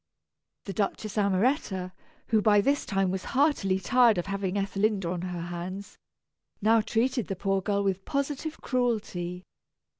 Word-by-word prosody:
The 195 - -4
Duchess 205 +2 -2
Amoretta, 200 - +1 0.4
who 220 -2 +3
by 210 -1 +5
this 280 +8 +1
time 195 -2 +1
was 190 0 -3
heartily 265 -10 +3
tired 235 +2 +4
of 175 - -1
having 195 -1 -2
Ethelinda 195 -1 0
on 180 -1 -3
her 180 -1 -4
hands, 175 +3 -6 0.6
now 225 +2 +4
treated 240 +1 0
the 195 - -3
poor 195 +1 0
girl 200 +1 0
with 195 -1 -1
positive 285 +4 -3
cruelty. 205 -8 -1
200 Hz, 145 wpm, -28 LUFS, 185-225 Hz, 0.6 s, by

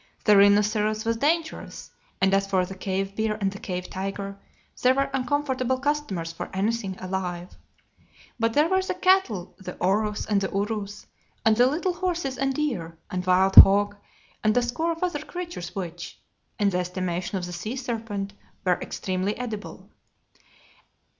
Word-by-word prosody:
The 210 - +6
rhinoceros 210 +2 +4
was 230 0 +1
dangerous, 320 +5 -2 0.3
and 190 0 +3
as 195 0 +2
for 190 -2 +2
the 190 - -8
cave 195 +1 -3
bear 220 0 0
and 195 -2 0
the 200 - -9
cave 180 -2 -4
tiger, 195 +1 -4 0.5
they 255 +1 +5
were 275 +1 0
uncomfortable 260 -1 0
customers 255 - -2
for - - -6
anything 195 -1 -1
alive. 180 -1 -4 0.8
But 230 0 +1
there 300 +5 +4
were 380 +2 +2
the 375 - -3
cattle, 365 - +2
the 185 -2 -8
aurochs 210 +3 +1
and 205 -2 +1
the 190 - -1
urus, 205 0 -3 0.4
and 220 -1 +5
the 245 +2 +5
little 335 +7 0
horses 345 -7 -2
and 270 0 +1
deer, 185 - -2
and 180 0 -2
wild 190 +1 +3
hog 205 +1 +9 0.5
and 215 +2 +3
a 245 - +4
score 280 +8 -1
of 330 +2 -4
other 350 -5 -1
creatures 345 - -6
which, 175 -3 -6 0.4
in 200 -1 +2
the 180 - 0
estimation 180 +1 -2
of 180 - -3
the 175 - -7
sea 215 +8 -4
serpent, 225 -6 -4 0.3
were 180 -1 +2
extremely 185 +2 -2
edible. 225 -4 -6
210 Hz, 160 wpm, -25 LUFS, 190-260 Hz, 0.8 s, hog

